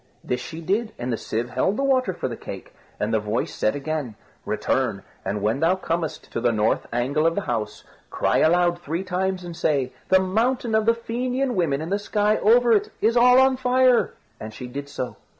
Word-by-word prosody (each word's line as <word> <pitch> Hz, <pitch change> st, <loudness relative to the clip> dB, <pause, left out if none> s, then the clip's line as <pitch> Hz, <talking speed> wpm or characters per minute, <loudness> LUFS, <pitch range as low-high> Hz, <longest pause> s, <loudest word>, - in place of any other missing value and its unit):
This 125 Hz, 0 st, -2 dB
she 160 Hz, +4 st, -7 dB
did, 210 Hz, +7 st, -1 dB
and 120 Hz, 0 st, -3 dB
the -, -, +1 dB
sieve 115 Hz, +2 st, -3 dB
held 130 Hz, +11 st, 0 dB
the 275 Hz, -, 0 dB
water 260 Hz, -6 st, +2 dB
for 175 Hz, -, -4 dB
the 120 Hz, -, -5 dB
cake; -, -, -9 dB, 0.3 s
and 105 Hz, +2 st, -1 dB
the 110 Hz, -, +3 dB
voice 105 Hz, +3 st, -2 dB
said 110 Hz, -, 0 dB
again: 145 Hz, -5 st, -3 dB, 0.3 s
"Return, -, -, -1 dB, 0.2 s
and 100 Hz, +1 st, -3 dB
when 110 Hz, +5 st, +1 dB
thou 165 Hz, +4 st, +3 dB
comest 165 Hz, -4 st, -4 dB
to 115 Hz, -, -3 dB
the 120 Hz, 0 st, +3 dB
north 110 Hz, -1 st, 0 dB
angle 135 Hz, +7 st, +1 dB
of 165 Hz, -, 0 dB
the 200 Hz, -, 0 dB
house, 110 Hz, -, -3 dB, 0.3 s
cry -, -, +1 dB
aloud 175 Hz, +1 st, +3 dB
three 170 Hz, +3 st, -3 dB
times 185 Hz, 0 st, -2 dB
and 175 Hz, -1 st, -7 dB
say, 140 Hz, -6 st, 0 dB, 0.2 s
'The 190 Hz, -, +6 dB
mountain 225 Hz, +5 st, 0 dB
of 220 Hz, 0 st, +2 dB
the 230 Hz, -, +5 dB
Fenian 250 Hz, +3 st, -2 dB
women 160 Hz, -8 st, 0 dB
and 165 Hz, -, -6 dB
the 200 Hz, -, +1 dB
sky 210 Hz, +1 st, +1 dB
over 235 Hz, +2 st, +4 dB
it 210 Hz, -, +2 dB
is 225 Hz, +2 st, +2 dB
all 250 Hz, +1 st, +6 dB
on 265 Hz, 0 st, +4 dB
fire.'" 255 Hz, -1 st, +3 dB, 0.2 s
And 110 Hz, 0 st, -8 dB
she 125 Hz, -, -7 dB
did 140 Hz, +3 st, -7 dB
so. 130 Hz, -3 st, -5 dB
175 Hz, 210 wpm, -23 LUFS, -, 0.3 s, The